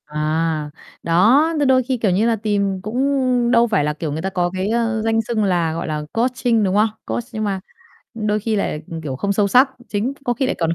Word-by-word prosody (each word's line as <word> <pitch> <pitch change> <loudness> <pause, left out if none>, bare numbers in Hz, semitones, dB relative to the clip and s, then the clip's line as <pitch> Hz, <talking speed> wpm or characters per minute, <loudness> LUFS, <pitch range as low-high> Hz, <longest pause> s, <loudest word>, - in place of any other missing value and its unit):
À, 155 0 -1 0.3
đó. 230 - +4
Thì 290 - +2
đôi 260 -1 +4
khi, 255 +1 -1
kiểu 220 -4 +1
như, 205 +6 +2
là 230 - +2
tìm 200 -3 -1
cũng 250 +1 +1
đâu 235 -1 +4
phải 205 -9 +1
là 150 +1 0
kiểu 155 0 -4
người 155 +2 -3
ta 190 - -2
có 180 -2 0
cái, 190 +1 -2
a, 230 -1 0
danh 225 0 +2
xưng 225 -1 -1
là, 175 -5 +1
gọi 165 +1 -4
là, 155 -1 -2
coaching, 240 -1 +1
đúng 190 -1 +1
không? 215 +2 +4 0.2
Coach, 240 - -3
nhưng 215 -2 -3
mà 195 -2 -1 0.6
đôi 215 -1 -1
khi 220 +1 -1
lại 155 -6 -2 0.2
kiểu 135 -4 -4
không 200 +9 -1
sâu 200 0 +1
sắc, 255 +6 +5 0.2
chính 215 +6 -1
có 245 - +1
khi 255 +3 -1
lại - - -1
còn 165 -1 0
210 Hz, 235 wpm, -20 LUFS, 175-235 Hz, 0.6 s, sắc